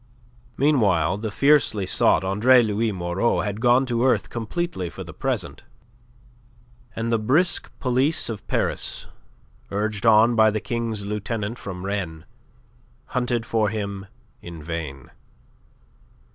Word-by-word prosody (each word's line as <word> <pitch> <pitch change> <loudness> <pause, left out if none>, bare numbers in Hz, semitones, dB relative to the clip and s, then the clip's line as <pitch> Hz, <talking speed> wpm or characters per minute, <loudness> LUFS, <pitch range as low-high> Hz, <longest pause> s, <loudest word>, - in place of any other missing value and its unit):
Meanwhile 105 - +2
the 110 0 -3
fiercely 140 -5 +3
sought 95 - +3
Andre 115 +7 +4
Louis 110 +1 0
Moreau 90 +4 0
had 105 +1 -4
gone 125 +2 +4
to 120 -1 0
earth 110 -8 +1
completely 115 - -3
for - - -8
the - - -10
present. - - -3 1.3
And 115 +1 -2
the 115 - +2
brisk 155 +10 +1
police 135 +5 +1
of 110 -4 -6
Paris, - - -2 0.6
urged 105 +2 -2
on 115 +2 +6
by 110 -1 +5
the 110 0 -1
King's 115 -1 -3
Lieutenant 105 +2 -3
from 95 -2 -7
Rennes, 90 -6 -4 0.9
hunted 125 -2 0
for 110 -3 +1
him 100 -2 -5 0.3
in 85 -3 -9
vain. 75 -5 -6
110 Hz, 125 wpm, -23 LUFS, 100-120 Hz, 1.3 s, on